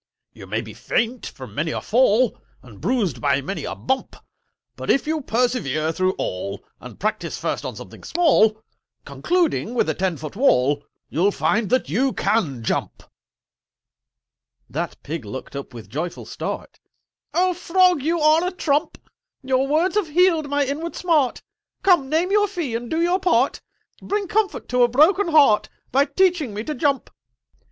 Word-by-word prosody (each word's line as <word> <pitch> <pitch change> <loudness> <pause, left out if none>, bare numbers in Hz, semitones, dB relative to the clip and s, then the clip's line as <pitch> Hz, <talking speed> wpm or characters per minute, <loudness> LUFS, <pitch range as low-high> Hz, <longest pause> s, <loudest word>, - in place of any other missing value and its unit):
"You - - -12
may - - -1
be - - -10
faint 240 +2 -1
from - - -10
many - - -1
a - - -2
fall, - - +3 0.3
And - - -14
bruised 195 - 0
by - - +2
many 190 +9 -5
a - - -4
bump: 265 0 -2 0.6
But, - - -7
if 275 - +3
you 310 0 -1
persevere 225 - 0
through 185 +3 0
all, 100 +2 -4 0.2
And 125 -3 -11
practice 215 +2 -2
first - - -3
on - - -5
something - - -11
small, 220 -11 +3 0.4
Concluding 335 -9 0
with 235 - +2
a - - +1
ten 180 -2 -1
foot 155 +4 -8
wall, 145 - +3 0.2
You'll 180 +6 +2
find 215 0 0
that 255 +3 +1
you 255 - +1
can 180 - 0
jump!" - - -2 1.6
That - - -4
Pig 155 -2 -5
looked 130 +7 -8
up 140 - -6
with 115 -4 -10
joyful 155 - -5
start: - - -6 0.6
"Oh 365 +1 +3
Frog, 360 -2 +3
you 330 +4 0
are 310 +2 +4
a 360 - 0
trump! 300 -5 0 0.5
Your 265 0 +1
words 320 +6 +2
have 410 -5 +1
healed 330 -2 +3
my 285 0 +1
inward 305 +5 -4
smart— 310 -8 +1 0.4
Come, 345 -9 +4
name 330 +5 +1
your 415 0 +4
fee 345 - -4
and 235 +1 -4
do 320 - -1
your 355 +2 +2
part: 275 -9 +2 0.4
Bring 405 -1 -2
comfort 415 +2 -1
to 250 0 +2
a 240 - +6
broken 320 - +4
heart 295 -10 +4 0.2
By 275 +3 +4
teaching 310 - +1
me 210 - -3
to 305 - -3
jump!" 280 -1 0
265 Hz, 165 wpm, -22 LUFS, -, 1.6 s, a